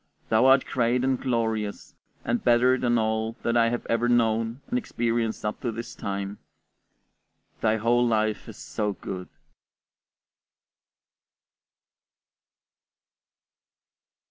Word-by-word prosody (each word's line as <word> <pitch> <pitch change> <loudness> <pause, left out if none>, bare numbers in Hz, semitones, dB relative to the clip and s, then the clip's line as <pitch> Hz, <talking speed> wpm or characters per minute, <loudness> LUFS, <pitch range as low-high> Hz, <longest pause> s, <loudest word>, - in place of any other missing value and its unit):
Thou 110 +4 +4
art 135 0 +5
great 125 0 +1
and 130 -1 +1
glorious, 110 -4 -2 0.3
and 120 0 0
better 125 +1 +4
than 120 -2 +1
all 110 0 0
that 115 - 0
I 115 -1 +4
have 120 0 -3
ever 115 +1 +1
known 115 0 +1
and 250 - 0
experienced 115 - -2
up 105 - -3
to 120 - -1
this 115 +1 -7
time. 100 0 -4 1.2
Thy 110 0 +2
whole 120 +2 +2
life 110 -2 0
is - - -10
so 105 -1 -3
good! 90 -1 -7
115 Hz, 110 wpm, -26 LUFS, 110-120 Hz, 1.2 s, art